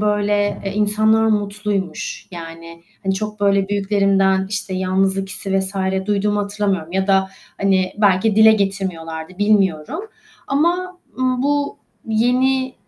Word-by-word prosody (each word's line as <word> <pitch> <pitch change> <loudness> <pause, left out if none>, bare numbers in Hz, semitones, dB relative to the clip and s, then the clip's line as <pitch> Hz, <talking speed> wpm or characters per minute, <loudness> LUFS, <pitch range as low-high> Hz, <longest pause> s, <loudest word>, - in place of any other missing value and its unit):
böyle, 205 -1 +1
eee, 195 - -3
insanlar 215 +1 +3
mutluymuş 205 -4 -2
yani, 165 -1 -10 0.2
hani, 195 0 0
çok 210 +1 -5
böyle 200 -1 +2
büyüklerimden, 195 -1 +2
işte, 205 -2 -3
yalnızlık 190 +1 0
hissi 195 0 -2
vs. 190 +1 -5 0.3
duyduğumu 205 0 +1
hatırlamıyorum 200 -5 -2
ya 190 0 0
da, 190 -1 +3 0.3
hani, 190 -2 +2
belki 205 +1 +3
dile 220 0 +8
getirmiyorlardı, 185 -4 -3
bilmiyorum 205 - +1 0.5
ama, 350 +6 0 0.2
ımm, 255 -1 0
bu 285 0 0 0.3
yeni 255 +4 +1
200 Hz, 120 wpm, -19 LUFS, 190-215 Hz, 0.5 s, dile